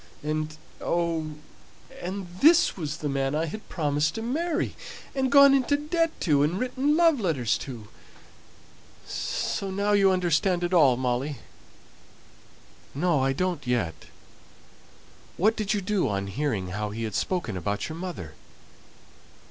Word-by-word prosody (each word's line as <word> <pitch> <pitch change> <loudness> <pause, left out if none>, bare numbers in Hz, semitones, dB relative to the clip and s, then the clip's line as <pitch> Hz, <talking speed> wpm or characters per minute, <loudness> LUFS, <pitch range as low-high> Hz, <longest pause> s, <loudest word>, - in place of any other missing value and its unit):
And, 155 0 -2 0.2
oh! 165 -2 -1 0.7
and 190 +2 -4
this 335 +4 +5
was 155 -4 -4
the 150 - -4
man 135 0 -1
I 160 +2 +1
had 210 +7 -8
promised 150 0 0
to 225 - -4
marry, 315 +7 -1 0.4
and 265 -1 0
gone 280 -1 +8
into 275 +1 +2
debt 330 +3 0
to, 145 -5 +3
and 155 +5 +1
written 260 +5 +1
love 330 -5 +4
letters 145 - +1
to! 120 -6 -8 1.2
So 195 - -3
now 200 +2 0
you 200 -1 +5
understand 180 0 +1
it 175 +1 -1
all, 140 -8 +5
Molly." 130 +3 -1 1.6
"No, 165 0 +2
I 135 0 +2
don't 175 -1 -2
yet. 115 -10 0 1.4
What 215 +5 +3
did 215 -2 -1
you 205 - -1
do 200 0 0
on 100 -1 -2
hearing 100 -3 -2
how 105 +3 -3
he 110 +2 -5
had 110 -2 -3
spoken 175 - -1
about 100 +3 -2
your 160 - -6
mother?" 165 - -6
170 Hz, 140 wpm, -26 LUFS, 135-210 Hz, 1.6 s, gone